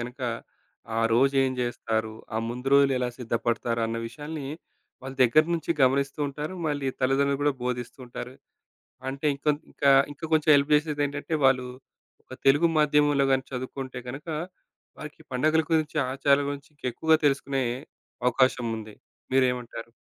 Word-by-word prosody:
గనక 125 +3 -7 0.8
ఆ - - +2
రోజు 135 +4 +3
ఏం 130 - +1
జేస్తారు 110 -2 -2 0.2
ఆ - - 0
ముందు 125 +3 -4
రోజులు 140 -1 +6
ఎలా 125 - 0
సిద్ధపడతారు 115 0 -1
అన్న 115 - -3
విషయాన్ని 150 +2 -7 0.6
వాళ్ళ 135 0 -7
దగ్గర 130 +6 +5
నుంచి 165 0 -3
గమనిస్తూ 135 +2 +2
ఉంటారు 150 +6 -5
మళ్ళీ 145 -2 -1
తల్లిదండ్రులు 135 +2 +2
గూడా 145 - +3
బోధిస్తూంటారు. 125 0 -5 0.7
అంటే 135 +3 -3
ఇంకొంతకా 145 0 0 0.2
ఇంకా 155 +3 -10
కొంచెం 155 -1 +3
హెల్ప్ 140 +1 +3
జేసేది 150 -1 +1
ఏంటంటే 145 +3 -4
వాళ్ళు 130 -1 +4 0.6
ఒక - - -11
తెలుగు 145 +5 +5
మాధ్యమంలో 145 -1 +3
గాని 130 0 +1
చదువుకుంటే 130 0 -5
గనక 135 +6 -7 0.7
వారికి 150 +1 -9
పండగల 155 +5 +2
గురించి 155 -1 +1 0.2
ఆచారాల 140 +1 +3
గురించి 140 -1 -7
ఇంకేక్కువగా 150 +4 +2
తెలుసుకునే 135 -1 0 0.6
అవకాశముంది. 115 -4 +1 0.4
మీరేమంటారు? 125 -3 0
135 Hz, 130 wpm, -26 LUFS, 125-145 Hz, 0.8 s, రోజులు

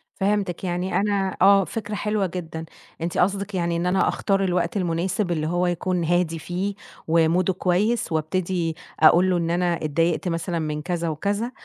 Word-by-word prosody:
فهمتِك. 195 -3 -1
يعني 180 +1 -2
أنا 200 -2 0
آه، 195 0 +6
فكرة 210 0 -5
حلوة 210 -1 0
جدًا. 165 -2 -6 0.4
أنتِ 170 +1 -2
قصدِك 200 +2 0
يعني 170 -1 0
إن 170 - -1
أنا 185 +1 +2
أختار 195 -1 +1
الوقت 180 0 0
المناسب 180 +2 -1
اللي 155 -2 -1
هو 175 +2 +1
يكون 175 0 -1
هادي 170 -1 +1
فيه 185 +5 -3 0.3
وموده 170 +3 +3
كويس 190 +5 0
وأبتدي 165 +1 -1 0.2
أقول 170 +4 +6
له 180 - +2
إن 170 -1 -1
أنا 175 0 +1
اتضايقت 165 +4 0
مثلًا 165 0 -2
من 150 -1 -3
كذا 170 0 -2
وكذا، 205 +9 -2
180 Hz, 165 wpm, -23 LUFS, 165-195 Hz, 0.4 s, آه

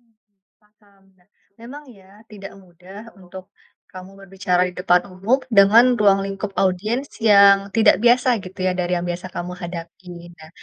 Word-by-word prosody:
Mmm, 215 -4 -43 0.2
paham. 210 -2 -31 0.2
Nah, 180 +2 -33 0.3
memang 280 +6 -12
ya 190 -1 -21 0.2
tidak 200 -2 -11
mudah 185 +1 -16 0.2
untuk, 185 +1 -13 0.5
kamu 185 +1 -13
berbicara 180 -1 -1
di 180 - -5
depan 180 -1 0
umum 200 +8 0 0.2
dengan 205 +4 +5 0.2
ruang 195 -1 +2
lingkup 195 0 -7
audiens 215 +9 -2
yang 200 -2 +4
tidak 220 -2 +3
biasa 240 -1 +2
gitu 185 0 -9
ya 185 - 0
dari 180 0 -3
yang 175 - -4
biasa 175 +1 -6
kamu 180 0 -7
hadapi, 175 0 -11
nah 160 -2 -17
195 Hz, 160 wpm, -19 LUFS, 180-210 Hz, 0.5 s, dengan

